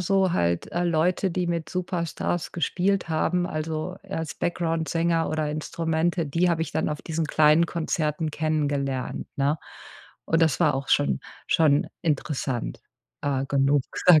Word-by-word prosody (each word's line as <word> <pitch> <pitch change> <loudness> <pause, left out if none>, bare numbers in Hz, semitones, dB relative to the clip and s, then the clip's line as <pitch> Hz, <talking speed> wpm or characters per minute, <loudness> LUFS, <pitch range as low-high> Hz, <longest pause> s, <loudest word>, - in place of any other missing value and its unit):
so 190 0 +2
halt, 85 - 0
äh, 175 - 0
Leute, 175 +3 +2
die 180 0 -1
mit 170 -2 -2
Superstars 175 -2 -2
gespielt 180 +3 0
haben, 175 +3 +1
also, 160 +2 -3
eher 195 -3 -5
als 160 -2 -4
Backgroundsänger 165 -1 0
oder 155 -1 -1
Instrumente, 165 +2 -1
die 170 +5 +2
habe 165 -1 +1
ich - - -5
dann - - 0
auf 150 -1 -4
diesen 160 -1 -2
kleinen 155 +2 +5
Konzerten 155 -2 -1
kennengelernt, 145 -4 -1
ne? 140 +3 +1 0.7
Und 165 0 +2
das 160 -4 +3
war 150 -5 +4
auch 135 0 -4
schon 70 -2 +2 0.3
schon 150 -3 +3 0.2
interessant, 145 -5 -2 0.4
äh, 135 -2 0
genug, 140 0 +3 0.2
sage 165 -4 +9
160 Hz, 150 wpm, -25 LUFS, 150-170 Hz, 0.7 s, sage